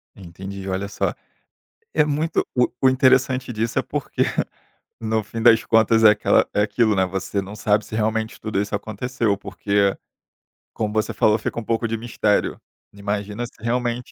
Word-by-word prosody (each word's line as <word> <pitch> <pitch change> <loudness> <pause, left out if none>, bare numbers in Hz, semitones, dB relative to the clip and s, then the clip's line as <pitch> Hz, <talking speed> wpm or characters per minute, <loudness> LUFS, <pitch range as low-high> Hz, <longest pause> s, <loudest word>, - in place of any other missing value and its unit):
Entendi, 95 +1 -8
olha 95 +2 -2
só. 105 - -1 0.8
É 150 - +4
muito 150 +2 0
o 125 -1 +3
o 130 - +5
interessante 130 0 +3
disso 115 +1 -1
é - - +1
porque, - - -3 0.8
no 110 -1 0
fim 115 +2 -6
das 115 -1 +6
contas 115 0 +4
é 105 - +10
aquela 105 - +3
é 105 - +3
aquilo 110 0 +2
né, 95 -1 +3
você 95 +2 -2
não 95 +2 -9
sabe 105 -1 +1
se - - -10
realmente 110 0 -1
tudo 105 -2 -1
isso 100 - -3
aconteceu, 110 +1 -1
porque 100 0 0 0.8
como 105 -1 -2
você 110 0 0
falou 105 0 +3
fica 110 - -3
um - - -6
pouco 115 +1 -1
de 115 0 -2
mistério. 110 -2 0 0.3
Imagina 100 +3 -3
se 120 - -11
realmente 120 +1 -2
110 Hz, 170 wpm, -22 LUFS, 100-115 Hz, 0.8 s, é